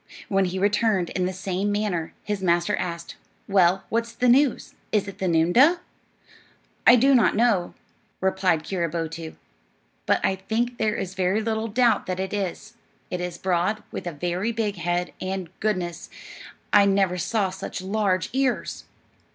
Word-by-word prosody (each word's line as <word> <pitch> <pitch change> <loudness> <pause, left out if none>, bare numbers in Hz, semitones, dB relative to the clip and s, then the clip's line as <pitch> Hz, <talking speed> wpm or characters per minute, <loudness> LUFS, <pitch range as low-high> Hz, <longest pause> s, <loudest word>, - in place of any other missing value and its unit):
When 195 -1 +2
he 185 +1 -3
returned 205 -2 +1
in 180 -1 0
the - - -2
same 190 +2 -2
manner, 205 -6 -2
his 205 -2 -3
master 175 +2 +2
asked: 170 -1 -5 0.3
"Well, 190 -1 +3
what's 230 0 -1
the 250 +2 0
news? 260 +2 +3 0.2
Is 205 -2 +1
it 200 - -9
the 190 - -1
noondah?" 175 - +4 1.1
"I 245 - +10
do 270 +3 +4
not 245 -4 +4
know," 215 -6 +2 0.4
replied 190 -4 +1
Keeroboto; 165 -2 -3 0.7
"but - - +3
I 190 - +1
think 230 +5 -2
there 215 -2 +1
is 185 - -4
very 190 +2 +1
little 220 0 -1
doubt 235 +2 +2
that 185 0 -3
it 190 +1 -3
is. 195 -4 -4 0.4
It 180 - -2
is 180 -1 -4
broad, 185 +4 0
with - - -6
a - - -2
very 180 +7 -2
big 215 -4 -2
head, 175 0 -2
and, 185 -2 -4
goodness, 185 -5 -2 0.6
I 205 -1 +7
never 195 -2 +2
saw 195 +2 0
such 190 - -6
large 190 -1 0
ears!" 265 -1 -1
190 Hz, 160 wpm, -24 LUFS, 180-215 Hz, 1.1 s, I